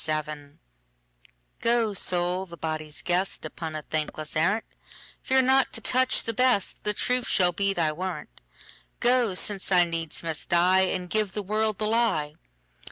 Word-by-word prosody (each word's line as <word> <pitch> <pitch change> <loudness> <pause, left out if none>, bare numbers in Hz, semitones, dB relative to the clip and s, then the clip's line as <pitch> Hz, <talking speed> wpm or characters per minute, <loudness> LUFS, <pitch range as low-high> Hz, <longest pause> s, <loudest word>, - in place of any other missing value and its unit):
The 155 -1 -1
Lie 145 -2 -9 1.1
GO, 230 -2 +1
Soul, 180 0 +1
the 170 -1 -11
body's 155 -1 -5
guest, 180 +2 -1
Upon 160 -2 -6
a 155 - -5
thankless 155 0 -4
arrant:Fear 220 +8 -1
not 265 +1 +3
to - - -4
touch 255 +1 +3
the 230 - -3
best; 250 -4 +1
The 210 - 0
truth 250 +1 +1
shall 180 -3 +3
be 195 +3 0
thy 165 -5 0
warrant:Go, 205 +6 -3
since 195 +1 +1
I 180 -1 +6
needs 165 -2 -4
must 160 -2 -4
die, 185 +2 +4
And 180 -1 -3
give 210 +1 -1
the 210 - -3
world 215 +1 0
the 215 - -2
lie. 215 -10 0
185 Hz, 155 wpm, -26 LUFS, 165-220 Hz, 1.1 s, I